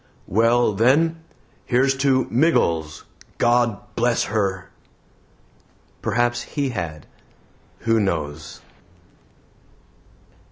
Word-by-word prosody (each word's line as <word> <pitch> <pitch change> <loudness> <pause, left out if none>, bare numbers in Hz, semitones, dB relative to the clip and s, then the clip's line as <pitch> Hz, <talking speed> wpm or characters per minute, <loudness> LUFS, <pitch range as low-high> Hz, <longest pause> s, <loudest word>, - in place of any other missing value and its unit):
"Well, 115 +2 +2
then, 145 +10 +3 0.5
here's 135 +2 +2
to 135 -2 +2
MIGGLES. 85 - +1 0.3
GOD 120 -2 0
BLESS 120 0 +1
HER!" 100 -4 -2 1.3
Perhaps 120 +2 0
He 140 -3 -3
had. 85 - -5 0.8
Who 115 -1 +2
knows? 80 -6 -3
115 Hz, 75 wpm, -22 LUFS, 95-125 Hz, 1.3 s, then